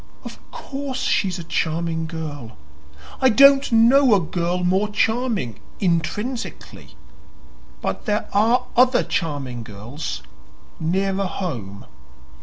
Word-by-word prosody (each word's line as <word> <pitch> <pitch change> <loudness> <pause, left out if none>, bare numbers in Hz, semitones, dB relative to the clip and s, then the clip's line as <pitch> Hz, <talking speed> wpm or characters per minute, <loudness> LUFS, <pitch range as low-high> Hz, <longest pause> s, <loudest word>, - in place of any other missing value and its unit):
"Of - - -9
course 270 -2 -5
she's 190 -7 +1
a 170 - -6
charming 165 0 -1
girl. 145 - -7 0.6
I 260 - +6
don't 275 +3 +6
know 235 +2 +6
a - - +3
girl 175 +1 -2
more 190 +4 +2
charming, 220 - -1 0.2
intrinsically. 210 +8 -3 0.9
But - - -3
there 210 0 -1
are 230 +5 +3
other 250 +1 +4
charming 140 -7 -3
girls 115 +7 -7 0.6
nearer 195 +4 0
home." 120 - -5
185 Hz, 105 wpm, -22 LUFS, 160-235 Hz, 0.9 s, I